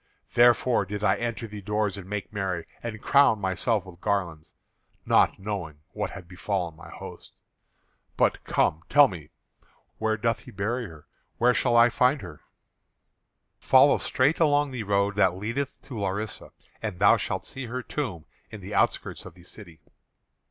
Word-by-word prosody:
Therefore 120 -1 +4
did 105 +2 -6
I 95 - +4
enter 120 0 -3
the 105 -2 -8
doors 105 0 -1
and 95 -2 -10
make 105 +1 -5
merry, 95 -4 -2 0.2
and 110 -2 -5
crown 140 -6 +4
myself 100 +2 0
with 90 -1 -14
garlands, 85 -6 -2 0.5
not - - +3
knowing 95 -7 -5
what - - -3
had 95 -3 -10
befallen 90 -2 -3
my 85 - -13
host. - - -11 0.8
But, - - +2
come, 80 - +1
tell 145 -1 +7
me; 80 -6 -9 0.7
where 110 0 0
doth 115 +1 0
he - - -14
bury 115 +5 -3
her? 80 -4 -14 0.3
Where 125 +1 +4
shall 120 -2 +2
I 120 +1 +7
find 125 +1 +2
her?" 85 -5 -10 1.2
"Follow - - +5
straight 135 +5 +1
along 145 -3 +3
the 125 -3 -4
road 100 0 +1
that 95 -3 +3
leadeth 115 +8 -4
to 130 -5 -7
Larissa, 100 +2 -4 0.3
and 105 -5 -4
thou 100 +2 +6
shalt - - -3
see 130 -2 -7
her 125 +2 -4
tomb 100 - -4 0.2
in 110 - -9
the 100 +2 -8
outskirts 100 - 0
of - - -13
the 90 - -17
city." 85 -4 -12
105 Hz, 165 wpm, -26 LUFS, 95-120 Hz, 1.2 s, tell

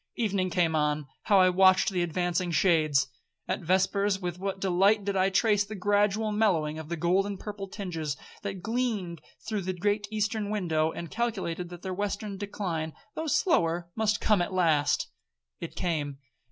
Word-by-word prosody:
Evening 200 -5 0
came 170 -2 +1
on; 150 -1 +1 0.2
how 200 -2 +5
I 185 0 +6
watched 185 +2 +5
the 180 -2 0
advancing 175 +1 0
shades! 155 -6 +3 0.4
At - - -1
vespers, 190 +3 +1
with 180 -1 -4
what 195 0 -3
delight 195 +2 +3
did 200 -1 -1
I 190 0 +3
trace 205 +1 +3
the 210 +2 -8
gradual 205 +2 +1
mellowing 170 -8 +1
of 160 0 -8
the 170 - -2
gold 180 +4 +2
and 200 -2 -5
purple 205 -2 -6
tinges 165 -8 -4 0.2
that 195 -3 -5
gleamed 220 - -2 0.3
through 215 -2 -1
the 185 0 -2
great 205 +3 0
eastern 215 -1 -1
window, 160 -6 0
and 170 -1 -7
calculated 190 -7 -2
that 175 -1 -10
their 190 -1 -3
western 205 +1 -3
decline, 180 -6 -3 0.2
though 320 - -4
slower, 175 - +1
must 215 -1 +1
come 210 -4 +3
at 175 - -2
last!—It 145 - -1
came. 150 -5 -2
185 Hz, 165 wpm, -28 LUFS, 170-205 Hz, 0.4 s, I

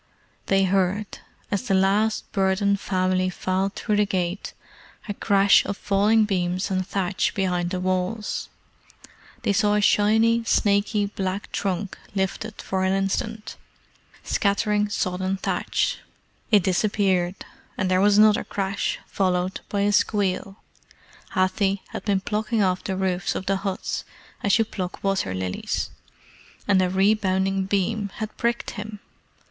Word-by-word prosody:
They 195 0 +3
heard, 195 +2 0 0.3
as 205 +5 -1
the 195 - +2
last 200 +3 +1
burdened 195 0 +1
family 185 -1 0
filed 185 +2 -1
through 210 -2 -1
the 210 - +4
gate, 185 0 -2 0.5
a 205 - -2
crash 200 -1 +4
of 200 - -4
falling 210 +2 +3
beams 185 -1 -1
and 185 -1 -1
thatch 190 -1 -1
behind 180 -3 0
the 185 0 -2
walls. 185 +4 -2 0.9
They 200 - +2
saw 205 +1 +3
a - - +3
shiny, 220 +3 +3
snaky 205 -1 +2
black 195 -1 -4
trunk 195 0 -3 0.2
lifted 200 +3 -3
for 190 0 -1
an 190 0 +2
instant, 210 +3 -2 0.7
scattering 210 +1 +1
sodden 185 -1 -1
thatch. - - -1 0.5
It 210 -4 +5
disappeared, 190 -1 +1 0.3
and 185 -1 0
there 185 0 +3
was 205 0 +5
another 215 0 +5
crash, 195 0 -2
followed 185 -1 -1
by 200 - -1
a 205 +1 +2
squeal. 200 -2 +1 0.8
Hathi 190 +1 +1
had - - -6
been 195 -2 +1
plucking 215 +2 0
off 185 -1 0
the 190 - -3
roofs 185 -1 -1
of 190 - -4
the 195 +1 +1
huts 195 -1 -3 0.4
as 200 +2 +3
you 225 - +2
pluck 185 -4 -6
water 195 - 0
lilies, 95 0 -3 0.8
and 195 -2 +4
a 185 - +2
rebounding 195 -1 +2
beam 200 +2 0
had 215 -1 -5
pricked 235 0 -1
him. 210 -1 -7
195 Hz, 140 wpm, -24 LUFS, 185-205 Hz, 0.9 s, It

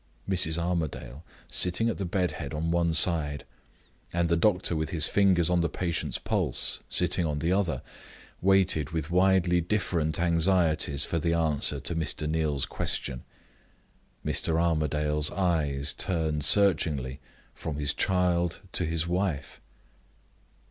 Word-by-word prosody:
Mrs. 85 -4 +1
Armadale, 80 -6 -3 0.2
sitting 90 +6 +2
at 115 - -2
the 95 - -2
bed 90 -1 -1
head 75 0 -6
on 80 +2 -2
one 85 -1 +1
side, 80 -3 +2 0.7
and 85 -1 0
the 85 - +3
doctor, 90 -1 +2
with 80 0 -2
his 80 -3 +2
fingers 95 -5 +3
on 90 -1 +3
the 85 - 0
patient's 85 0 -2
pulse, - - -1
sitting 90 0 +1
on 75 -3 -2
the 80 +4 -1
other, 90 -8 0 0.6
waited 95 -6 +3
with 80 0 -4
widely 90 -1 +3
different 85 -5 -1
anxieties 85 -4 +1
for 85 - -2
the 85 +1 0
answer 80 -4 +1
to 85 - -3
Mr. 80 -1 -2
Neal's 75 -3 0
question. 65 0 -4 1.0
Mr. 80 0 0
Armadale's 75 -2 0
eyes 75 -7 0
turned 80 -5 -2
searchingly 75 -8 +2 0.3
from 80 - -6
his 75 -1 -1
child 90 -2 0
to 90 - +1
his 80 0 -1
wife. 90 -5 -2
85 Hz, 135 wpm, -27 LUFS, 75-90 Hz, 1.0 s, the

